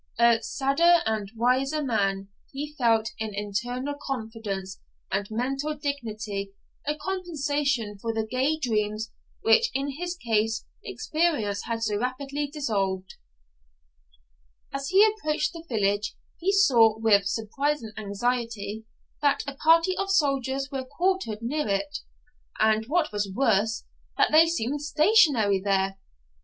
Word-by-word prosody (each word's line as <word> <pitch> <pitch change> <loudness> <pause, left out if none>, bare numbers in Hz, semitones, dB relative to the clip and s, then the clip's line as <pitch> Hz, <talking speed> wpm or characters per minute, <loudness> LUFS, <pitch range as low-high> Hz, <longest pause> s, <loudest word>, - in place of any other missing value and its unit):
'A 235 -1 +5
sadder 335 +6 +3
and 215 -3 -1
a 225 - -21
wiser 265 +6 +1
man,' 195 -6 0 0.2
he 295 +2 -5
felt 225 -4 +2
in 220 -2 -4
internal 240 +7 -3
confidence 220 -7 -5 0.3
and 200 0 -1
mental 270 +7 -2
dignity 215 -9 -4 0.3
a 295 - +1
compensation 290 - -2
for 230 +3 -2
the 220 -1 -2
gay 260 +7 0
dreams 215 -5 -1 0.3
which 475 0 +5
in 275 +1 -1
his 355 0 -3
case 225 -4 0 0.2
experience 300 -12 -1
had 230 -1 -2
so 210 -2 0
rapidly 275 +4 -2
dissolved. 200 -10 -2 1.6
As 275 0 -3
he 390 +3 +7
approached 310 -8 0
the 335 -1 -9
village 205 -2 0 0.2
he 375 +3 +1
saw, 240 - +5
with 205 -3 +3
surprise 275 +7 -1
and 220 -1 -8
anxiety, 220 0 -3 0.4
that 285 -1 +2
a 280 - -4
party 330 +5 +4
of 390 0 -2
soldiers 275 -5 +1
were 270 -1 -3
quartered 285 - -1
near 295 +4 -1
it, 195 -1 -1 0.6
and, 220 0 +3
what 315 +1 +1
was 205 -1 -2
worse, 220 -1 +1 0.3
that - - +3
they 320 +2 +7
seemed 290 -3 -1
stationary 295 - +4
there. 195 -1 0
245 Hz, 130 wpm, -26 LUFS, 215-295 Hz, 1.6 s, he